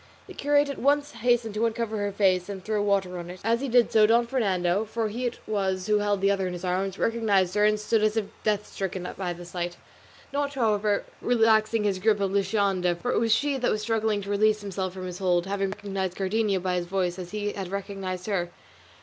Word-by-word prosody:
The - - -11
curate 290 0 +2
at 280 - -5
once 290 +2 +2
hastened 235 -1 +1
to 215 +2 +1
uncover 225 -1 -3
her 205 0 -1
face 190 -2 +2
and 190 -2 -7
throw 215 -1 0
water 195 -3 0
on 175 0 -7
it, 180 +1 -8
and 225 +2 +2
as 235 - 0
he 275 - -2
did 240 0 +4
so 215 -1 +6
Don 235 +2 +4
Fernando, 195 -6 +1
for 220 0 -2
he 245 +4 -2
it 240 - -5
was 190 -3 -1
who 210 0 +2
held 205 -1 0
the 195 0 +4
other 195 -2 0
in 180 - -4
his 175 +1 -6
arms, 190 +1 -1
recognised 205 -6 +1
her 210 0 +3
and 215 0 +3
stood 215 +1 +1
as 215 +1 +1
if 220 - +1 0.2
death 210 -1 +1
stricken 190 -2 -4
by 185 -2 -3
the 175 0 -8
sight; 175 0 -4 0.6
not, 285 0 -1
however, 210 -4 +1 0.2
relaxing 225 -2 +3
his 200 -3 0
grasp 210 +1 +2
of 195 -1 0
Luscinda, 195 -3 +1
for 245 - -1
it - - +2
was 225 0 +1
she 285 +4 +2
that 250 - 0
was 215 0 -1
struggling 220 -2 0
to 200 - -5
release 215 +1 +2
herself 190 -2 -3
from 185 0 -7
his 180 -1 -6
hold, 180 -2 +2
having 195 0 -1
recognised 195 -2 -4
Cardenio 200 0 +1
by 180 0 -1
his 175 -1 -3
voice, 185 -1 -1
as 180 -1 -6
he 205 0 -2
had 195 -2 -5
recognised 195 -1 -5
her. 185 -5 -1
205 Hz, 235 wpm, -26 LUFS, 185-220 Hz, 0.6 s, so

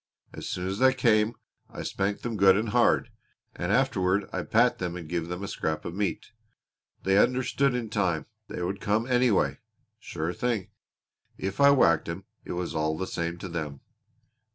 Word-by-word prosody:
As - - -6
soon 90 - -3
as 95 +2 -3
they 130 0 +5
came 115 -2 +3 0.3
I - - -7
spanked 100 +1 -2
them 120 -2 -3
good 95 -1 +6
and 110 +1 -1
hard, - - +3 0.4
and - - -2
afterward 95 +2 +2
I'd 95 - -4
pat 120 +2 +3
them 90 -1 -3
and 85 -3 -7
give 85 0 -2
them 90 +2 -5
a - - -3
scrap 80 -4 -3
of 85 - -4
meat. 100 -3 -2 0.7
They 95 +1 +4
understood 130 +2 +2
in 120 -2 -2
time. 90 -7 0 0.2
They 90 - -5
would 95 +3 -3
come 110 +3 +1
anyway 125 -4 +2 0.4
sure 80 +3 -4
thing. 115 -1 -2 0.7
If 95 +6 -3
I 140 - +8
whacked 85 - +4
'em - - -5 0.2
it - - -5
was 90 0 -3
all 80 0 0
the 95 - -2
same 85 -1 -3
to 95 - -7
them. 75 -5 -5
95 Hz, 180 wpm, -27 LUFS, 85-115 Hz, 0.7 s, I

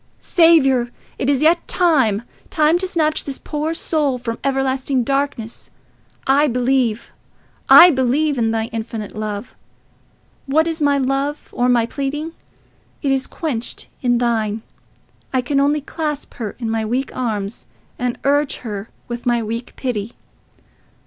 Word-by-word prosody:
"Saviour! 270 -8 +4 0.3
It 265 - 0
is 285 0 +2
yet 335 +2 +3
time—time 305 - +1
to 375 - -1
snatch 310 -4 0
this 275 -2 -5
poor 305 +2 -3
soul 295 -6 0
from 230 -2 -5
everlasting 270 -1 0
darkness. 275 -4 -2 0.6
I 280 +3 +4
believe—I 250 +6 +3
believe 275 +2 +1
in 225 -1 +2
thy 225 0 0
infinite 225 -2 -5
love. 215 +1 -5 0.9
What 310 +4 +3
is 330 -1 -3
my 285 -1 +3
love 275 +2 -1
or 245 +1 +2
my 240 -2 +3
pleading? 285 +5 -3 0.7
It 275 - +1
is 265 -1 0
quenched 255 -8 -4
in 245 -2 +2
thine. 225 -3 0 0.7
I 260 - +1
can 275 +3 0
only 290 +2 +2
clasp 300 0 -4
her 215 -5 -5
in 235 - -4
my 225 0 -1
weak 250 +5 -2
arms 215 -4 -3 0.3
and 245 -1 -1
urge 285 +1 +2
her 210 -1 -5 0.2
with 240 0 -5
my 240 -1 +2
weak 230 +3 -5
pity. 235 -4 -3
265 Hz, 135 wpm, -19 LUFS, 235-295 Hz, 0.9 s, Saviour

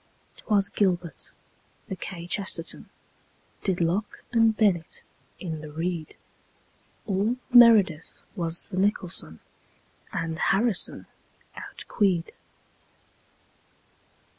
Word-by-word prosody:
'Twas 205 -2 +2
gilbert. 180 -7 -1 0.6
The 190 - -4
kchesterton 175 0 -2 0.7
Did 190 -3 0
locke 180 +6 -1
and 225 -2 +4
bennett 180 -7 +1 0.4
in 160 -4 -5
the 155 -1 -9
reed. 165 0 -3 0.9
All 205 +5 0 0.2
meredith 215 -10 +6
was 170 -1 -2
the 185 - -5
nicholson, 185 - 0 0.7
And 165 -1 -3
harrison 205 +1 +1 0.5
outqueed. 185 -6 -1
185 Hz, 80 wpm, -26 LUFS, 165-205 Hz, 0.9 s, meredith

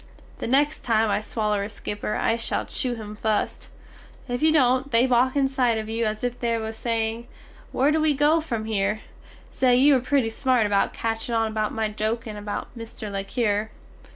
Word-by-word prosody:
The - - -3
next 285 +5 +2
time 225 -4 +1
I - - +1
swaller 210 -2 -1
a 205 - -5
skipper 210 0 -4
I 225 - +1
shall 230 - -1
chew 250 -2 -2
him 210 -2 -8
fust, 215 0 -2 0.6
if 245 +1 -3
you 315 0 +5
dont 260 -2 +3
they 235 -1 +5
walk 255 +1 +2
inside 265 -4 +2
of 220 0 -4
you 225 0 0
as 215 +1 -4
if 245 0 -2
they 235 -1 0
was 220 0 -4
saying 230 0 -2 0.4
"where 275 +4 +2
do 315 0 +2
we 310 -2 +3
go 300 +4 +3
from 235 -8 -3
hear?" 210 0 -1 0.5
Say 250 -2 +3
you 280 +4 +6
were 265 - +4
pretty 250 -2 +1
smart 250 -1 +2
about 200 -1 +2
catching 225 +1 -3
on 225 -1 +1
about 215 -1 -1
my 220 -1 -1
jokin 215 +1 -3
about 205 +3 -6
Mr. 225 -2 -8
le 195 0 -3
Cure. 215 -1 -1
230 Hz, 195 wpm, -24 LUFS, 215-255 Hz, 0.6 s, you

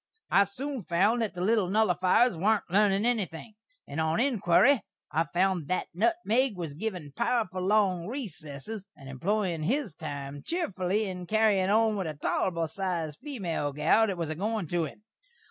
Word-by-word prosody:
I 200 - +6
soon 260 +6 -5
found 200 +7 +2
that 220 -5 -2
the 175 - -4
little 205 -1 +2
nullifiers 195 +2 +3
warn't 210 +5 +2
lernin' 200 +1 +3
enything, 215 -4 -2 0.3
and 150 +3 -3
on 160 +4 +1
inquiry 245 0 +4 0.3
I 160 +2 +1
found 175 -2 0
that 185 - -1
nutmeg 255 - +1
was 165 -4 -4
a - - -11
givin' 180 -7 -4
powerful 190 -7 0
long 185 -3 +2
recessess, 200 - -7
and 135 -2 -13
employin' 175 +5 -1
his 225 - -1
time 145 -3 -6
cheefly 205 - -1
in 180 -2 -6
carryin' 210 -2 +3
on 220 0 +3
with 190 -4 -2
a 155 - -4
tolerbul 165 +3 -1
sized 165 -4 -3
female 175 - -3
gal 155 +10 +3
that 195 -3 -2
was 165 -2 -2
a - - -3
goin' 210 +2 -2
to 175 -2 0
him. 205 +7 -11
190 Hz, 165 wpm, -28 LUFS, 165-220 Hz, 0.3 s, I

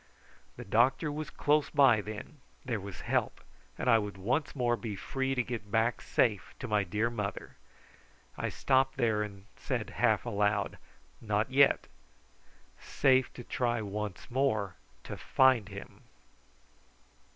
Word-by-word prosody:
The - - -9
doctor 130 +9 +2
was 155 +1 -5
close 150 0 +1
by, 135 -7 +5
then. 110 +8 -8 0.3
There 115 -4 -1
was 100 -2 -8
help, - - -1 0.4
and - - -3
I 115 -2 +6
would 105 -2 -5
once 125 +12 -1
more 120 -3 +1
be 105 -1 -5
free 135 +6 -2
to 125 - +1
get 115 -4 -6
back 115 +3 +1
safe 110 -6 0
to 125 - -6
my 105 -2 +2
dear 105 +6 -1
mother. 105 -4 -5 0.8
I - - -2
stopped 135 0 +1
there 110 -4 +2
and 100 -2 -6
said - - -3
half - - +2
aloud: 105 0 0 0.4
"Not 105 +2 0
yet 140 +1 +4 1.0
safe 130 -1 +2
to 120 - -9
try 120 0 -1
once 105 +1 -5
more 120 -7 +1 0.3
to - - -7
find 130 -6 +3
him." 100 -1 -10
115 Hz, 140 wpm, -31 LUFS, 105-130 Hz, 1.0 s, I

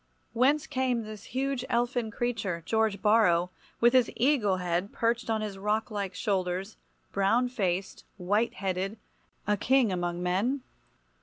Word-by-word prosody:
Whence 270 +5 +3
came 255 -4 0
this 215 0 -9
huge 265 0 -2
elfin 240 -1 0
creature, 215 -7 -2
George 220 -3 0
Borrow, 185 -5 +4 0.3
with 240 +1 +5
his 255 -2 +4
eagle 230 -7 +2
head 180 +2 -1
perched 230 +1 0
on 220 -1 +1
his 205 -2 -5
rocklike 210 -2 -2
shoulders, 190 0 -1 0.4
brown 225 +6 +2
faced, 195 -6 -2
white 205 +5 0
headed, 195 +2 -2 0.5
a 210 0 +1
king 255 0 +3
among 175 -1 -2
men? 215 +10 0
215 Hz, 135 wpm, -28 LUFS, 190-240 Hz, 0.5 s, with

